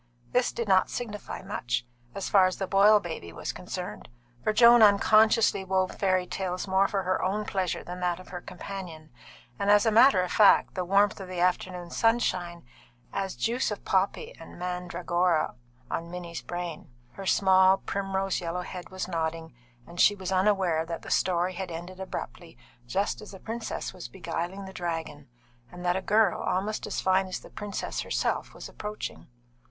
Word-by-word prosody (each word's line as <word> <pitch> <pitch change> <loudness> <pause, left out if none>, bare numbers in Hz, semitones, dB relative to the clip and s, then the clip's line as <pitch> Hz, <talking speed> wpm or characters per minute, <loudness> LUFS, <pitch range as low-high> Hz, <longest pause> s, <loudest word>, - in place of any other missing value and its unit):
This 250 0 +2
did 235 -2 -4
not 190 -1 +4
signify 210 -6 -6
much, 120 -11 -2 0.3
as 195 - -3
far 190 -2 +5
as 185 - -3
the 195 - -2
Boyle 205 +3 +6
baby 160 - -7
was 85 - -5
concerned, - - -7 0.3
for - - +2
Joan 235 +2 +7
unconsciously 215 0 +5
wove 190 0 0
fairy 185 -2 +2
tales 185 0 -3
more 190 +1 +3
for 195 -1 -1
her 185 +1 0
own 210 +3 -1
pleasure 190 -4 -2
than 180 +1 -7
that 180 -1 -1
of 185 - -13
her 180 -1 -6
companion, 175 -5 -8 0.5
and 200 - 0
as 205 +2 +6
a 225 - +3
matter 220 -4 +6
of 180 - -4
fact 210 -2 +5
the 185 - -2
warmth 200 +3 +3
of 190 - -7
the 180 -1 -5
afternoon 180 -1 -1
sunshine 185 -7 0 0.5
had - - -4
acted 195 - +1
as 190 - -7
"juice 235 - 0
of 210 - -6
poppy 200 - 0
and - - -12
mandragora" 180 -1 0 0.3
upon 165 +7 -4
Minnie's 170 -1 -6
brain. 175 -3 -6 0.2
Her 195 +8 -8
small, 190 0 +5
primrose 195 -1 -2
yellow 175 +1 -3
head 180 0 -8
was 185 -1 -4
nodding, 165 -3 -3 0.3
and 170 +1 -3
she 205 - +6
was 190 -1 -5
unaware 185 -4 +2
that 165 0 -6
the - - -7
story 180 0 +1
had 185 0 -5
ended 175 +3 -7
abruptly 125 -11 -7 0.3
just 195 - -1
as 210 - -11
the 190 - -10
princess 225 +2 -5
was - - -8
beguiling 175 +6 -5
the 190 - -10
dragon, 165 -6 -5 0.4
and 180 0 -9
that 175 0 +2
a 190 - -1
girl 210 0 +2
almost 205 +4 -2
as - - -3
fine 190 0 +2
as 185 - -4
the - - -15
princess 205 -1 -4
herself - - -2
was - - -8
approaching. 210 0 -7
185 Hz, 180 wpm, -28 LUFS, 175-200 Hz, 0.5 s, Joan